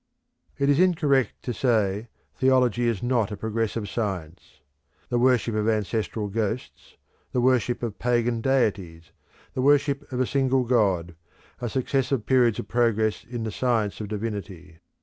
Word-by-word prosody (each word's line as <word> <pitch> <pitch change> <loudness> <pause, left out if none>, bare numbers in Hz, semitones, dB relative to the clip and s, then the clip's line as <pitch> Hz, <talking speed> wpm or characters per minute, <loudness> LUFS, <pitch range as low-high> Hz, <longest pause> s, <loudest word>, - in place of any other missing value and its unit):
It 140 0 +1
is 145 +1 +3
incorrect 150 - +2
to 125 - -3
say 110 -3 +1 0.3
"theology 125 -3 +2
is 115 -4 -1
not 120 -4 +1
a 105 - -5
progressive 110 0 -2
science." 95 -6 -5 0.5
The 120 - +1
worship 125 -2 +2
of 110 +1 +1
ancestral 110 0 -1
ghosts, 110 +3 -4 0.4
the 125 - +1
worship 125 -1 +1
of 115 -4 -4
pagan 120 -1 +1
deities, 95 -11 -1 0.4
the 130 - -2
worship 140 0 +2
of 125 - -3
a 130 - +3
single 135 0 +1
god, 100 -8 +1 0.5
are 120 - -2
successive 130 -1 -1
periods 120 -4 +3
of - - -5
progress 110 -2 +1
in 120 -1 -6
the 110 - -3
science 110 -4 0
of 105 - -4
Divinity. 100 -5 -6
115 Hz, 150 wpm, -25 LUFS, 105-130 Hz, 0.5 s, is